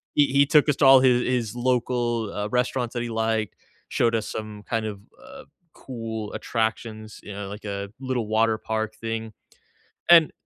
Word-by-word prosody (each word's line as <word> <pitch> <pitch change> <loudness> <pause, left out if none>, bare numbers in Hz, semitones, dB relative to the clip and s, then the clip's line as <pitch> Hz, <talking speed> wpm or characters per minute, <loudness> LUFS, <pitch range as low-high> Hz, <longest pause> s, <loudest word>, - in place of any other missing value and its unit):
he 145 - +6
he 140 +1 +4
took 150 +1 +4
us 145 - +3
to 145 - +3
all 135 -1 +8
hi 130 - +5
his 125 -2 +1
local, 120 -3 0
uh, 105 +1 -2
restaurants 125 0 -1
that 120 - -2
he 120 - -4
liked, 110 -2 -1 0.3
showed 115 -1 +1
us 110 - -2
some 110 -1 -6
kind 115 0 -2
of, 100 -2 -6 0.2
uh, - - -12 0.3
cool 115 -4 -6
attractions, 110 -1 -3
you 105 - -8
know, 100 0 -6
like 105 +1 -9
a 100 0 -4
little 130 -4 -2
water 110 +1 +2
park 110 0 -3
thing, 115 -1 -5 0.8
and 165 -3 +7
115 Hz, 180 wpm, -24 LUFS, 110-125 Hz, 0.8 s, all